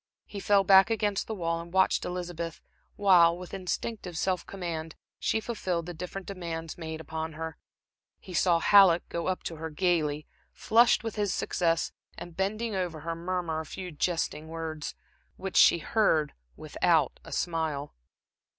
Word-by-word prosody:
He 205 Hz, -, -7 dB
fell 200 Hz, 0 st, +4 dB
back 190 Hz, +1 st, +7 dB
against 210 Hz, -3 st, 0 dB
the 220 Hz, -, -3 dB
wall, 165 Hz, -3 st, -1 dB
and 170 Hz, 0 st, -11 dB
watched 190 Hz, +1 st, +2 dB
Elizabeth 175 Hz, -2 st, -4 dB, 0.4 s
while, 175 Hz, -4 st, +5 dB
with 180 Hz, 0 st, -10 dB
instinctive 185 Hz, 0 st, -4 dB
self 185 Hz, 0 st, 0 dB
command, 165 Hz, -4 st, -5 dB, 0.2 s
she 225 Hz, -, +1 dB
fulfilled 185 Hz, -7 st, -3 dB
the 175 Hz, -, -6 dB
different 180 Hz, +3 st, -6 dB
demands 165 Hz, -4 st, -5 dB
made 160 Hz, -2 st, -6 dB
upon 160 Hz, 0 st, -5 dB
her. 160 Hz, +1 st, -6 dB, 0.6 s
He 185 Hz, -, -11 dB
saw 175 Hz, 0 st, +3 dB
Halleck 180 Hz, -1 st, +6 dB
go 170 Hz, -, -3 dB
up 185 Hz, -1 st, -1 dB
to 165 Hz, -, -5 dB
her 160 Hz, +1 st, -5 dB
gaily, 155 Hz, -3 st, 0 dB, 0.3 s
flushed 235 Hz, +2 st, +4 dB
with 225 Hz, -1 st, -5 dB
his 205 Hz, -2 st, 0 dB
success, 165 Hz, -2 st, 0 dB, 0.3 s
and 175 Hz, -2 st, -9 dB
bending 215 Hz, +4 st, -1 dB
over 175 Hz, -5 st, -3 dB
her, 165 Hz, +2 st, -3 dB
murmur 170 Hz, -2 st, -2 dB
a 160 Hz, -, -5 dB
few 185 Hz, +2 st, -7 dB
jesting 160 Hz, -1 st, -2 dB
words, 160 Hz, -1 st, -5 dB, 0.4 s
which 190 Hz, 0 st, -6 dB
she -, -, +7 dB
heard 160 Hz, -4 st, +1 dB, 0.2 s
without -, -, +1 dB
a -, -, -12 dB
smile. 160 Hz, -4 st, -2 dB
175 Hz, 160 wpm, -28 LUFS, 160-190 Hz, 0.6 s, back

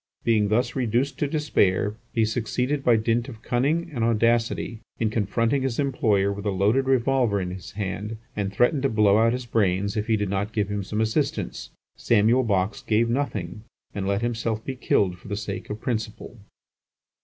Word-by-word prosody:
Being 110 Hz, -3 st, +3 dB
thus 120 Hz, +4 st, 0 dB
reduced 130 Hz, +2 st, 0 dB
to 145 Hz, -, +1 dB
despair, 105 Hz, -, +1 dB, 0.2 s
he 115 Hz, -2 st, +2 dB
succeeded 125 Hz, +5 st, -1 dB
by 120 Hz, -3 st, +5 dB
dint 115 Hz, +3 st, 0 dB
of 115 Hz, -3 st, -11 dB
cunning 155 Hz, +8 st, 0 dB
and 120 Hz, -4 st, -1 dB
audacity 115 Hz, 0 st, +1 dB, 0.2 s
in 110 Hz, -2 st, 0 dB
confronting 115 Hz, +5 st, +1 dB
his 130 Hz, -3 st, -2 dB
employer 110 Hz, -8 st, +1 dB
with 100 Hz, +1 st, -5 dB
a -, -, +2 dB
loaded 105 Hz, +8 st, +2 dB
revolver 130 Hz, -4 st, +2 dB
in 90 Hz, -1 st, -3 dB
his 95 Hz, +1 st, -9 dB
hand, 105 Hz, +2 st, -4 dB, 0.2 s
and 100 Hz, -2 st, -2 dB
threatened 125 Hz, +8 st, +2 dB
to 135 Hz, -, +2 dB
blow 105 Hz, -2 st, +4 dB
out 115 Hz, +1 st, +4 dB
his 125 Hz, +1 st, -3 dB
brains 100 Hz, -3 st, +1 dB
if 105 Hz, -1 st, -2 dB
he 110 Hz, -2 st, +2 dB
did 100 Hz, -2 st, -2 dB
not 100 Hz, +2 st, -2 dB
give 105 Hz, -3 st, 0 dB
him 105 Hz, 0 st, -2 dB
some 105 Hz, +3 st, -2 dB
assistance. 110 Hz, 0 st, -1 dB, 0.3 s
Samuel 115 Hz, +3 st, +3 dB
Box 100 Hz, -3 st, 0 dB
gave 115 Hz, +2 st, +1 dB
nothing, 105 Hz, -8 st, -2 dB, 0.3 s
and 100 Hz, -1 st, -3 dB
let 100 Hz, +3 st, 0 dB
himself 115 Hz, -2 st, -2 dB
be 135 Hz, -, -4 dB
killed 95 Hz, -7 st, +1 dB
for -, -, -14 dB
the 100 Hz, 0 st, -3 dB
sake 105 Hz, -2 st, -5 dB
of 105 Hz, -, -4 dB
principle. 110 Hz, 0 st, -4 dB
110 Hz, 185 wpm, -25 LUFS, 100-120 Hz, 0.3 s, by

